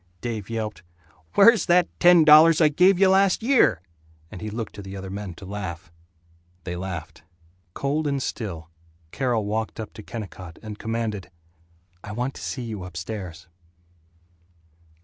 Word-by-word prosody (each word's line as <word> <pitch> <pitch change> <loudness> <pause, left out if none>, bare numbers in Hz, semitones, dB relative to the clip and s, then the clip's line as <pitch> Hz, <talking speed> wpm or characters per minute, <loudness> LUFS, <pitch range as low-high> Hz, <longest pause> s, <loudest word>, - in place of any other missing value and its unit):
Dave 110 -2 -5
yelped, 110 -4 -4 0.5
"Where's 220 +1 +6
that 175 -1 +4
ten 175 -2 +7
dollars 155 +1 +7
I 155 -2 +5
gave 180 +5 +4
you 190 0 +5
last 195 +2 +3
year?" 230 - +3 0.5
and - - -9
he 110 - -4
looked 110 0 -5
to 100 - -9
the 95 0 -8
other 95 0 -7
men 100 -3 -6
to 95 - -11
laugh. 95 -3 -6 0.7
They 90 0 -5
laughed. 85 -3 -6 0.5
Cold 145 +2 -1
and 140 -1 0
still, 85 -10 -5 0.4
Carol 120 -5 -1
walked 110 +2 -3
up 110 - -6
to - - -10
Kennicott 95 -6 -8
and 110 -1 -8
commanded, 115 -3 -3 0.7
"I 100 - -7
want 125 +4 -2
to - - -11
see 130 - -4
you 110 -5 -6
upstairs." 90 0 -7
110 Hz, 150 wpm, -24 LUFS, 95-145 Hz, 0.7 s, ten